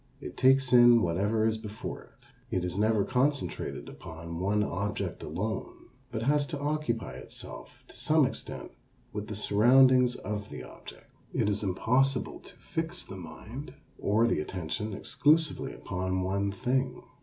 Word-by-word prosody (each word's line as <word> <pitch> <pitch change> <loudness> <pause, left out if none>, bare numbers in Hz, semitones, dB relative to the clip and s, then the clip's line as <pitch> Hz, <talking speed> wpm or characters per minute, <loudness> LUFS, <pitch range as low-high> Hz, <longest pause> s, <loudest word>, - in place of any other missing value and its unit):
It - - -8
takes 135 0 +4
in 120 -1 +8
whatever 100 +6 +1
is 110 0 +1
before 105 0 -6
it. - - -22 0.3
It 90 - -1
is 90 -1 -3
never 105 0 +2
concentrated 135 +3 -1
upon 85 +1 -8
one 105 +3 +2
object 100 +1 -3
alone, 110 +5 -4 0.2
but 110 -1 -3
has 145 +2 +2
to 145 -2 -4
occupy 145 - -1
itself 65 - -11
to - - -16
some - - +3
extent - - -6 0.4
with 105 0 -4
the 105 - -5
surroundings 125 +4 +5
of 105 0 -5
the - - -7
object. - - -12 0.3
It - - +2
is 105 0 0
impossible 125 +7 +1
to - - -15
fix 165 +2 -4
the - - -9
mind, 110 - -9 0.2
or 110 +3 +3
the 120 - +2
attention, 90 +6 -3
exclusively 145 +4 +2
upon 95 0 -2
one 100 +2 0
thing. 125 +5 -1
110 Hz, 150 wpm, -29 LUFS, 100-130 Hz, 0.4 s, in